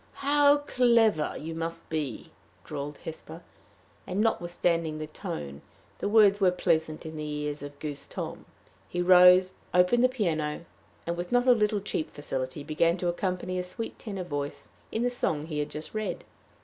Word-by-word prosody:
"How 290 Hz, 0 st, +5 dB
clever 235 Hz, -, +2 dB
you 160 Hz, +2 st, -5 dB
must 165 Hz, +1 st, -5 dB
be!" 155 Hz, -4 st, -4 dB, 0.3 s
drawled 145 Hz, +1 st, -6 dB
Hesper; 160 Hz, +1 st, -8 dB, 0.6 s
and, 185 Hz, +1 st, -2 dB
notwithstanding 175 Hz, -6 st, 0 dB
the 155 Hz, -, -4 dB
tone, 70 Hz, -, -6 dB, 0.4 s
the -, -, -1 dB
words 205 Hz, -2 st, +5 dB
were 190 Hz, -, +6 dB
pleasant 160 Hz, -4 st, 0 dB
in 160 Hz, 0 st, -7 dB
the 155 Hz, -, -4 dB
ears 150 Hz, 0 st, -3 dB
of 145 Hz, 0 st, -8 dB
goose 145 Hz, -1 st, -6 dB
Tom. -, -, -6 dB, 0.4 s
He 175 Hz, -, -3 dB
rose, 180 Hz, +1 st, +7 dB, 0.2 s
opened 180 Hz, +7 st, +4 dB
the 255 Hz, -, +6 dB
piano, 165 Hz, -10 st, -1 dB, 0.4 s
and, 170 Hz, -, -1 dB
with 175 Hz, +1 st, -5 dB
not 245 Hz, +1 st, +3 dB
a -, -, +8 dB
little 210 Hz, -3 st, +2 dB
cheap 175 Hz, -5 st, -3 dB
facility, 135 Hz, 0 st, -4 dB
began 165 Hz, +3 st, +1 dB
to 175 Hz, -1 st, -1 dB
accompany 185 Hz, 0 st, -2 dB
a -, -, -1 dB
sweet 225 Hz, +5 st, -6 dB
tenor 195 Hz, -4 st, -5 dB
voice 145 Hz, -3 st, -5 dB, 0.2 s
in 225 Hz, -, -1 dB
the 245 Hz, -, +1 dB
song 155 Hz, -11 st, -1 dB
he 155 Hz, -2 st, -4 dB
had 145 Hz, -, -2 dB
just 155 Hz, +1 st, -8 dB
read. 215 Hz, -1 st, -3 dB
175 Hz, 170 wpm, -28 LUFS, 155-205 Hz, 0.6 s, a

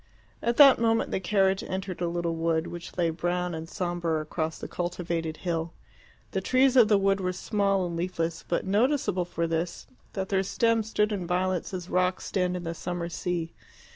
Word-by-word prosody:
At 235 Hz, 0 st, 0 dB
that 275 Hz, -5 st, +9 dB
moment 225 Hz, -1 st, +2 dB
the -, -, 0 dB
carriage 190 Hz, 0 st, +2 dB
entered 190 Hz, -1 st, -4 dB
a 175 Hz, -, +1 dB
little 170 Hz, -1 st, -1 dB
wood, 165 Hz, 0 st, 0 dB
which 175 Hz, +1 st, -8 dB
lay 170 Hz, -2 st, +2 dB
brown 175 Hz, +2 st, -1 dB
and 160 Hz, 0 st, -6 dB
sombre 175 Hz, -3 st, -1 dB
across 155 Hz, +1 st, -3 dB
the -, -, -6 dB
cultivated 170 Hz, -2 st, -3 dB
hill. 165 Hz, -2 st, -2 dB, 0.6 s
The -, -, -1 dB
trees 260 Hz, 0 st, +3 dB
of 240 Hz, -4 st, +7 dB
the 210 Hz, -1 st, +5 dB
wood 195 Hz, 0 st, +2 dB
were 185 Hz, 0 st, 0 dB
small 195 Hz, 0 st, 0 dB
and 170 Hz, -1 st, -4 dB
leafless, 165 Hz, -1 st, -2 dB
but 175 Hz, -, -1 dB
noticeable 205 Hz, -2 st, +1 dB
for 170 Hz, -1 st, -2 dB
this 165 Hz, +1 st, -2 dB, 0.3 s
that 190 Hz, -1 st, -3 dB
their 195 Hz, -1 st, +2 dB
stems 220 Hz, +3 st, +1 dB
stood 210 Hz, -1 st, +1 dB
in 190 Hz, -4 st, -3 dB
violets 180 Hz, 0 st, 0 dB
as 180 Hz, -2 st, -5 dB
rocks 185 Hz, 0 st, 0 dB
stand 180 Hz, -2 st, 0 dB
in 175 Hz, -, -6 dB
the 165 Hz, 0 st, -3 dB
summer 170 Hz, +1 st, -4 dB
sea. 170 Hz, 0 st, -3 dB
180 Hz, 190 wpm, -27 LUFS, 170-195 Hz, 0.6 s, that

